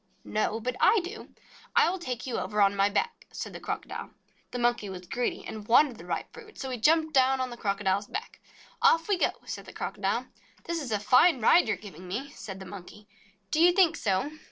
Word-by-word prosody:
"No 215 +1 -1
but 250 +2 -3
I 450 - +5
do. 415 +5 -8 0.5
I 470 -1 +6
will 375 - -4
take 250 -7 -4
you 255 - -2
over 210 -1 -3
on 200 0 +4
my 200 0 +3
back," 460 - -2
said - - -6
the - - -7
Crocodile. - - -5 0.4
The - - -5
Monkey 240 -4 +1
was 180 -1 -8
greedy, 245 +7 -2
and 215 -1 -7
wanted 245 +1 +5
the - - -11
ripe - - -4
fruit, 435 -2 -13
so 265 - -5
he 250 - -3
jumped 315 +5 +3
down 265 -1 +4
on 255 -1 -2
the - - -6
Crocodile's 200 -2 -1
back. 430 +6 -6 0.4
"Off 330 0 +4
we 410 - +3
go - - +3
!" - - -24
said - - -6
the - - -11
Crocodile. - - -2 0.4
"This 340 -1 -3
is 260 -5 -6
a 210 - +2
fine 255 - +5
ride 255 +6 +5
you 220 - +1
are - - -14
giving 185 -3 -11
me!" 255 +10 -4
said 195 -8 -8
the 190 - -8
Monkey. 200 +2 -11 0.4
"Do 315 - +2
you 350 +1 +7
think 350 -3 +4
so? 200 - 0
245 Hz, 225 wpm, -28 LUFS, 205-325 Hz, 0.5 s, you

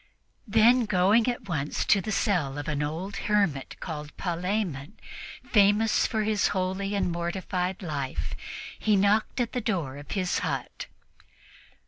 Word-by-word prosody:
Then, 230 +3 +5
going 205 +4 +3
at 245 -4 -2
once 150 -5 -2
to 200 - +4
the 215 - -4
cell 170 -10 0
of 145 +2 -5
an 150 -1 -1
old 165 +7 -3
hermit 195 -11 0
called 150 -3 -7
Palemon, 180 -3 -2 0.5
famous 210 +1 +4
for 220 -1 -1
his 210 -1 +2
holy 190 +2 -1
and 195 -3 0
mortified 180 +2 -2
life, 140 -6 -3 0.5
he 215 - +3
knocked 205 +5 +2
at 240 -2 0
the 250 - -2
door 170 - -2
of 145 - -11
his 185 -3 0
hut. - - -4
190 Hz, 140 wpm, -27 LUFS, 160-210 Hz, 0.5 s, Then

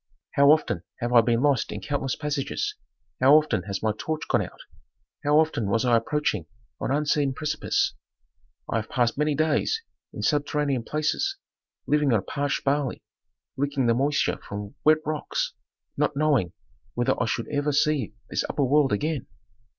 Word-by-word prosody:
"How 140 0 +5
often 150 - +3 0.2
have 120 0 -2
I 120 - +8
been 115 +2 +1
lost 140 -4 +2
in 105 - -4
countless 135 +4 -2
passages, 150 - -2 0.5
how 135 +3 +7
often 155 -11 +3
has 100 0 -4
my 110 -1 +2
torch 155 +6 -3
gone - - +2
out, - - -7 0.6
how 145 +1 +4
often 155 -10 +2
was 115 +5 +1
I 120 -1 +4
approaching 115 - 0 0.3
an - - -2
unseen 145 -1 +1
precipice? 150 +1 0 0.7
I - - -1
have 110 - -4
passed 120 -2 +1
many 150 0 +1
days 155 - +1 0.3
in - - -6
subterranean 145 -3 +1
places, 155 - -1 0.5
living 150 -3 +2
on 100 -4 +1
parched 145 0 -2
barley, 140 -2 0 0.5
licking 140 -1 0
the 115 - +4
moisture 140 +5 +1
from 100 0 -7
wet 155 0 +4
rocks, 155 -1 -2 0.4
not 150 0 0
knowing 140 - +2 0.4
whether 120 0 +2
I 120 - +1
should 115 0 -2
ever 145 0 0
see 145 -7 +1
this - - -1
upper 145 - 0
world 140 +1 +3
again. 145 +6 -1
140 Hz, 160 wpm, -26 LUFS, 120-150 Hz, 0.7 s, I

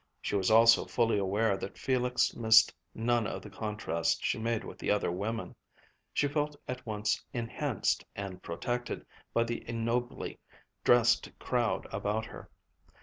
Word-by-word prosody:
She - - -2
was 95 -2 +2
also 115 +1 +7
fully 115 -3 +1
aware 100 +2 +1
that 100 - -7
Felix 125 -1 +1
missed 110 -1 +6 0.2
none 115 -1 +1
of - - -5
the 105 - -10
contrast 105 -6 -1
she - - 0
made 115 0 -1
with - - -9
the - - -3
other 105 -4 +2
women. 110 +5 -3 0.6
She 145 - +1
felt 150 +1 -1
at 125 0 -5
once 105 -1 -1
enhanced 115 -2 -1
and 95 -2 -6
protected 120 +8 -3 0.3
by 115 - +3
the 115 0 -4
ignobly 115 +1 -2 0.4
dressed 120 -1 +4
crowd 120 -3 0
about 105 +3 -1
her. - - -11
115 Hz, 145 wpm, -31 LUFS, 105-120 Hz, 0.6 s, also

